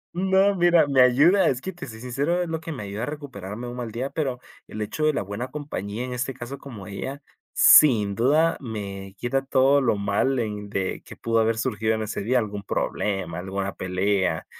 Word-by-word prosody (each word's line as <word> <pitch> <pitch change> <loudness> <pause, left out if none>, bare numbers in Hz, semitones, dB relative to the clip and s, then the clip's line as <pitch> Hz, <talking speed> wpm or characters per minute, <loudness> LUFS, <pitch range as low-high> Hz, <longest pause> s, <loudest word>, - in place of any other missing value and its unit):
No, 190 +2 +3
mira, 175 -3 +5
me 135 -2 +3
ayuda, 145 +11 +5
es 130 -2 -1
que 190 +6 -6
te 170 -6 -9
soy 110 -1 -10
sincero, 140 +9 -1
es - - -5
lo 160 -1 -3
que 165 0 -6
me 130 -8 -6
ayuda 100 +2 -5
a - - -1
recuperarme 125 -7 -7
un 120 - -6
mal 120 -2 -5
día, 125 +5 -4
pero 135 -5 -2 0.3
el 110 - -8
hecho 155 +8 -2
de 155 - +3
la 100 - -1
buena 100 +6 -5
compañía, 125 -6 -5
en 125 - -5
este 125 +1 -3
caso 130 +3 -7
como 115 -8 -10
ella, 135 +8 -6 0.3
sin 110 -9 +6
duda 150 +10 +3
me 100 -5 -6
quita 135 +4 -1
todo 135 +1 +3
lo 115 -4 +2
mal 100 +7 0
en 105 -3 -3
de 95 -2 -2
que - - -11
pudo 115 0 0
haber 115 0 +2
surgido 110 0 0
en 110 - -2
ese 105 -1 -4
día, 120 +6 +1
algún 105 -3 -2
problema, 95 -3 -2
alguna 95 +1 -3
pelea, 95 -2 0
120 Hz, 210 wpm, -24 LUFS, 100-140 Hz, 0.3 s, sin